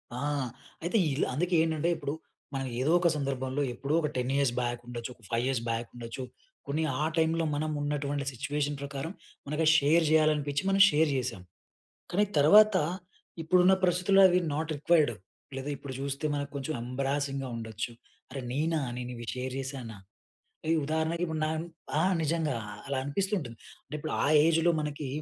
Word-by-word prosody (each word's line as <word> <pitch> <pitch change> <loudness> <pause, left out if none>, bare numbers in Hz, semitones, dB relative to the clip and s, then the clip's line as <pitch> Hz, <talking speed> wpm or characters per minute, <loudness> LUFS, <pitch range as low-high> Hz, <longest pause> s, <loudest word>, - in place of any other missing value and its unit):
ఆ! - - -4 0.6
అయితే 175 +7 +1 0.2
ఇలు 135 - +1
అందుకే 175 +6 0
ఏంటంటే 160 0 0
ఇప్పుడు 140 - -3 0.4
మనం 135 0 -2 0.2
ఏదో 145 +5 +2
ఒక 175 - +3
సందర్భంలో 135 -1 -2
ఎప్పుడో 140 +4 -3
ఒక 150 - 0
10 125 +1 -1
ఇయర్స్ 140 -3 +2
బ్యాక్ 120 -1 -2
ఉండొచ్చు. 120 -1 -5
ఒక 115 - -25
5 115 +1 +1
ఇయర్స్ 130 -3 0
బ్యాక్ 115 0 -2
ఉండొచ్చు. 120 +1 -6 0.4
కొన్ని 150 +3 0 0.2
ఆ - - +2
టైంలో 165 +1 +2
మనం 155 +1 -1
ఉన్నటువంటి 145 -1 -2
సిట్యుయేషన్ 145 +3 -2
ప్రకారం 140 +3 -4 0.4
మనకు 150 +3 0
షేర్ 155 +3 +4
జేయాలనిపించి 150 -2 +2
మనం 195 0 +4
షేర్ 155 -1 +3
జేశాం. 125 -7 -3 0.7
కానీ 205 +4 +3
తర్వాత 210 +8 +7 0.7
ఇప్పుడున్న 180 +3 +5
పరిస్థితుల్లో 180 +2 +4
అవి 180 0 +3 0.2
నాట్ 160 +2 -2
రిక్వైర్డ్ 150 -2 +3 0.4
లేదా 135 +2 -4
ఇప్పుడు 140 0 -8
జూస్తే 140 +2 -2
మనకు 145 0 -3
కొంచెం 140 +3 -3
ఎంబారసింగ్‌గా 135 +2 -2
ఉండచ్చు. 110 +1 -5 0.4
అరె! 135 - -5
నేనా? 155 +4 0 0.2
నేను 125 0 -5
ఇవి 120 0 -7
షేర్ 130 0 -4
జేశానా? 130 -5 -6 0.7
ఈ - - +5
ఉదాహరణకి 160 +3 -1
ఇప్పుడు 160 -1 -3
న - - +1 0.5
ఆ! - - +4 0.2
నిజంగా 155 -3 0 0.3
అలా 140 0 -2
అనిపిస్తూ 190 +8 -1
ఉంటుంది. 120 -8 -7 0.3
అంటే - - -9
ఇప్పుడు 155 +1 -4
ఆ - - +2 0.2
ఏజ్‌లో 165 +1 +3
మనకి 150 -1 -4
145 Hz, 160 wpm, -29 LUFS, 130-160 Hz, 0.7 s, తర్వాత